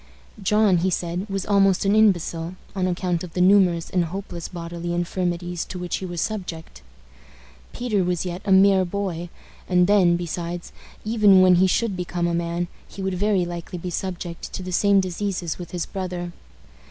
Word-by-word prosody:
John, 210 -1 +3
he 185 +3 +1
said, 180 +3 -2
was 195 -1 -2
almost 195 -2 +3
an 200 +2 +3
imbecile, 175 -5 +2 0.2
on 185 -1 0
account 180 -1 -1
of 175 -3 -8
the - - -3
numerous 180 -3 +4
and 180 -2 +2
hopeless 175 -1 -6
bodily 170 0 -5
infirmities 175 0 -2
to 185 - -7
which 180 -1 -3
he 190 - -5
was 175 -1 -5
subject. 180 - -5 0.9
Peter 220 -6 0
was 180 0 -1
yet 180 +1 -4
a 195 - -1
mere 190 0 +6
boy; 175 -2 -3 0.4
and 180 -1 +4
then, 185 -3 +4
besides, 175 0 -5 0.3
even 210 -4 +5
when 185 -1 +6
he 190 +1 +5
should 205 +2 0
become 175 -1 -2
a 170 - 0
man, 170 +1 -1 0.2
he 195 - -8
would 190 0 -1
very 195 -1 +1
likely 175 +1 -6
be 180 +1 -5
subject 175 -1 -5
to 185 - -5
the 185 - -5
same 200 +2 +4
diseases 185 -2 -3
with 175 - -7
his 175 -2 -3
brother. 180 -2 -5
180 Hz, 175 wpm, -23 LUFS, 175-195 Hz, 0.9 s, mere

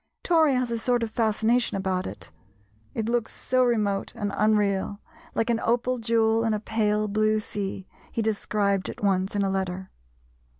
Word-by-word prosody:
Tory 320 -5 +4
has 250 -1 0
a 230 - -1
sort 245 0 +1
of 225 - -3
fascination 225 0 +1
about 190 -1 -1
it, - - -8 0.6
it 220 -1 -1
looks 235 -1 0
so 255 0 +1
remote 210 -5 0
and 205 -1 -3
unreal, 205 -2 +1 0.4
"like 225 +1 +1
an 230 - +1
opal 245 +2 +1
jewel 225 0 +2
in 225 -1 +1
a - - -2
pale 215 -1 0
blue 215 +1 +2
sea," 195 -2 -4 0.2
he 230 - -1
described 205 -2 0
it - - -8
once 195 0 +1
in 200 - +2
a 195 - +1
letter. 190 -1 -3
215 Hz, 170 wpm, -26 LUFS, 200-230 Hz, 0.6 s, Tory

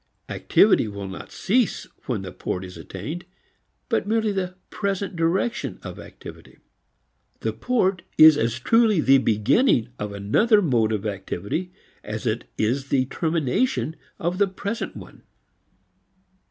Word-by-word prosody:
Activity - - +4
will 100 -1 -6
not 95 - -8
cease 235 +2 +1 0.2
when 115 -8 -2
the 95 - -6
port 90 +1 -4
is 90 - -10
attained, 145 - -6 0.6
but - - 0
merely 220 0 +1
the 185 -2 -3 0.2
present 200 -2 -2
direction 185 +9 0
of - - -7
activity. - - -12 0.8
The - - -1
port 195 -7 +1 0.2
is 155 -1 +9
as 115 -4 0
truly 220 - +3
the 135 -2 +5
beginning 115 - +3
of 105 0 -3
another 110 - +3
mode 120 - +2
of 105 -1 -2
activity 100 - -3 0.3
as - - -5
it - - -2
is 130 +6 0
the 130 -2 +2
termination 160 - 0 0.2
of 175 +3 -2
the 200 - +4
present 200 +4 -4
one. - - -12
160 Hz, 135 wpm, -24 LUFS, -, 0.8 s, is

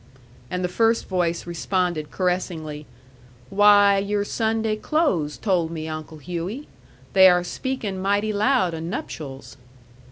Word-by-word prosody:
And 180 0 -3
the - - +1
first 225 +5 +1
voice 175 -3 -1
responded 175 -2 -1
caressingly: 165 -5 -3 0.6
"Why, 205 0 +6
your 205 +1 -1
Sunday 220 0 0
clothes 215 - 0
told 180 -6 0
me, 160 -1 -5
Uncle 155 0 -7
Hughey. 180 - -5 0.5
They 190 -1 +8
are 180 0 +3
speakin' 210 -1 -4
mighty 205 +2 +1
loud 210 -4 +2
o' 165 - -4
nuptials." 150 -5 -6
185 Hz, 125 wpm, -23 LUFS, 165-210 Hz, 0.6 s, They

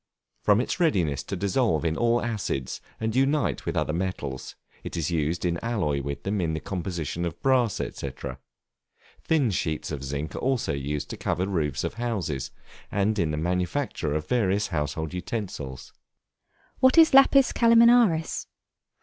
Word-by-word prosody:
From 105 0 +4
its 130 +8 -2
readiness 90 - +2
to 100 - -4
dissolve 100 - +1
in 80 -1 +1
all 120 +3 +2
acids, 105 - -3 0.2
and 110 0 -2
unite 135 - +1
with - - -1
other 75 - 0
metals, 80 -7 -4 0.3
it - - -6
is 85 0 -1
used 80 +1 -1
in 85 -1 0
alloy 90 -12 0
with 70 0 -5
them 100 0 -1
in 80 -2 -1
the - - -2
composition 85 -2 -4
of 85 -2 -4
brass, 125 -6 +3
&c. 70 - -4 1.1
Thin 145 -8 +2
sheets 80 -5 -2
of 70 -3 -4
zinc 70 +3 -4
are - - -3
also 130 - 0
used 70 +1 -3
to - - -6
cover 90 - -1
roofs 80 -8 -1
of - - -2
houses, 95 - -2 0.4
and 105 +1 +1
in 85 -3 +1
the 75 - -2
manufacture 90 - -1
of 75 0 -3
various 100 -4 +1
household 80 -1 -2
utensils. 90 - -5 0.9
What 260 +4 +5
is 320 -3 +7
Lapis 275 0 +6
Calaminaris? 230 -7 +4
90 Hz, 160 wpm, -26 LUFS, 75-120 Hz, 1.1 s, is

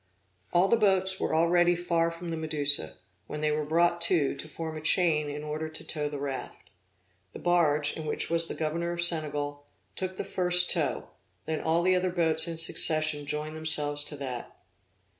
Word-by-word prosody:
All 175 +2 +2
the 230 - +2
boats 190 -3 +1
were - - -2
already 175 +2 +2
far 170 -1 -1
from 170 +1 -9
the 165 - -4
Medusa, 150 -3 +2 0.3
when 150 - -7
they 155 0 0
were 150 0 -2
brought 170 +3 0
to, 170 -5 +1
to 155 - -9
form 160 +1 -7
a 155 - -7
chain 155 -2 +1
in 145 +1 -7
order 155 +1 -5
to 155 - -10
tow 150 -2 -4
the 145 - -7
raft. 140 -1 -8 0.6
The - - -9
barge, 150 -4 0
in 155 -1 -8
which - - -3
was 165 0 +8
the - - -3
governor 170 +2 -3
of 170 0 +1
Senegal, 145 -3 0 0.3
took 185 0 -5
the - - -4
first 180 -2 +3
tow, - - -3 0.4
then 160 -1 -4
all 165 +2 0
the 185 +1 +2
other 180 0 -1
boats 165 -2 +1
in 165 -1 -5
succession 155 -2 +4
joined 150 +1 -5
themselves 150 -2 +1
to 145 - -7
that. 130 -4 -8
160 Hz, 190 wpm, -27 LUFS, 150-175 Hz, 0.6 s, was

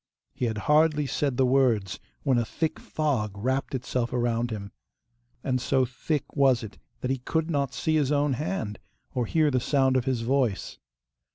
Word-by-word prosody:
He 125 - -2
had 110 -2 -1
hardly 150 0 +4
said 135 -1 -1
the 130 - +4
words 125 -7 +2 0.2
when 130 -4 +3
a - - +1
thick 155 +7 -2
fog 120 -10 -1
wrapped 130 +5 -1
itself 125 -1 -2
around 120 -1 0
him, 100 -3 -6 0.7
and 130 -2 0
so 130 0 +2
thick 130 +3 -3
was 135 -4 +4
it 110 - -9 0.2
that 130 - -1
he 135 - -1
could 160 +6 -1
not 140 -3 0
see 155 0 +1
his 145 -2 +1
own 145 -1 +2
hand, 130 - -3 0.3
or 125 -4 -1
hear 155 -2 +3
the 130 - +2
sound 130 0 +2
of 130 -1 +1
his 130 -3 0
voice. 120 -4 0
130 Hz, 180 wpm, -27 LUFS, 120-145 Hz, 0.7 s, hardly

